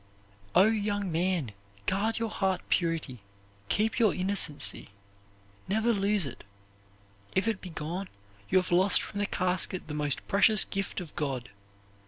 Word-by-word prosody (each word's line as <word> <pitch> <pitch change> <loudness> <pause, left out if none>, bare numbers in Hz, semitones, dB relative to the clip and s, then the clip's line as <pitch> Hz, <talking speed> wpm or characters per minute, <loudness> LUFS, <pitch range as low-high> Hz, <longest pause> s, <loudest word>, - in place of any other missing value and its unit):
O, 180 - +8
young 205 -3 0
man, 170 - 0 0.3
guard 215 +4 0
your 230 -1 -2
heart 190 -4 0
purity! 165 -7 -1 0.5
Keep 220 +3 +1
innocency! 185 - +2 0.8
Never 220 +4 +1
lose 200 -2 +2
it; 130 -3 -8 0.9
if 190 +3 +1
it 220 -4 -1
be 185 - -8
gone, 170 +4 -5 0.4
you - - +3
have 185 0 0
lost 185 +3 +4
from 205 - -6
the 205 - 0
casket 185 -1 0
the 150 - -6
most 150 -2 -1
precious 210 +1 +5
gift 195 -1 -3
of 165 -4 -10
God. 130 -7 -3
190 Hz, 140 wpm, -29 LUFS, 165-205 Hz, 0.9 s, O